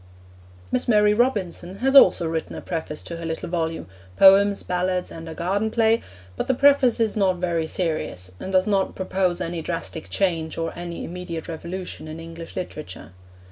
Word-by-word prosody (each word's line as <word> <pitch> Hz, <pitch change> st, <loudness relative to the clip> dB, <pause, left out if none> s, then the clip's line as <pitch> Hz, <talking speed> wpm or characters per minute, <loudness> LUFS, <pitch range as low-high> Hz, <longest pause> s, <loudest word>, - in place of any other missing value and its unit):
Miss 125 Hz, -, 0 dB
Mary 210 Hz, -2 st, +5 dB
Robinson 200 Hz, -6 st, 0 dB
has 270 Hz, +4 st, +1 dB
also 175 Hz, -10 st, +7 dB
written 160 Hz, 0 st, -3 dB
a -, -, -6 dB
preface 160 Hz, -3 st, -4 dB
to 170 Hz, -, -6 dB
her 165 Hz, -, -6 dB
little 160 Hz, 0 st, -4 dB
volume, 165 Hz, -2 st, -2 dB, 0.3 s
Poems, 195 Hz, +1 st, +6 dB
Ballads, 180 Hz, 0 st, -1 dB
and 165 Hz, 0 st, -8 dB
a 160 Hz, -, -7 dB
Garden 195 Hz, +7 st, 0 dB
Play, 225 Hz, 0 st, +3 dB, 0.3 s
but -, -, -3 dB
the 265 Hz, -, +2 dB
preface 275 Hz, -3 st, +4 dB
is 225 Hz, -2 st, +1 dB
not 195 Hz, -3 st, +2 dB
very 170 Hz, -2 st, -1 dB
serious, 155 Hz, -, -3 dB
and 190 Hz, -, -6 dB
does 185 Hz, 0 st, +3 dB
not 195 Hz, -2 st, 0 dB
propose 185 Hz, -1 st, 0 dB
any 170 Hz, -2 st, -3 dB
drastic 165 Hz, -1 st, -5 dB
change 165 Hz, -5 st, -1 dB
or 165 Hz, -1 st, -2 dB
any 170 Hz, 0 st, -6 dB
immediate 175 Hz, -2 st, -6 dB
revolution 170 Hz, +1 st, -6 dB
in 155 Hz, +1 st, -7 dB
English 165 Hz, 0 st, -9 dB
literature. 150 Hz, -, -7 dB
180 Hz, 175 wpm, -23 LUFS, 165-200 Hz, 0.3 s, also